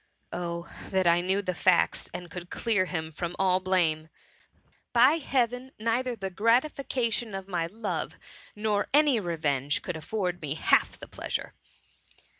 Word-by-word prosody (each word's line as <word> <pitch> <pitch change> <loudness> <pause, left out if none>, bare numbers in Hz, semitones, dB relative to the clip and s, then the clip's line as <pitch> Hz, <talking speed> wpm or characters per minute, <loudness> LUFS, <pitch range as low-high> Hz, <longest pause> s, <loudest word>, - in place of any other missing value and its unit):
Oh, 170 -1 -4 0.2
that 190 -1 +1
I 170 0 +5
knew 190 +3 +1
the 185 - -1
facts, 180 0 +2
and 175 -2 -7
could 175 -1 -7
clear 215 -5 +1
him 160 -3 -4
from 175 +2 -4
all 185 -1 +3
blame! 170 -4 +1 0.8
By 255 +7 +6
heaven! 255 -2 -1
neither 235 +3 0
the 195 -3 -5
gratifica 235 +3 +1
tion 220 -4 -3
of 195 0 -6
my 175 -4 -1
love, 215 +3 -4 0.4
nor 210 -1 0
any 295 -5 +5
revenge, 150 -6 -1
could 180 - -4
afford 180 +1 -3
me 150 -1 -2
half - - +3
the - - -10
pleasure - - -4
190 Hz, 150 wpm, -28 LUFS, 175-230 Hz, 0.8 s, By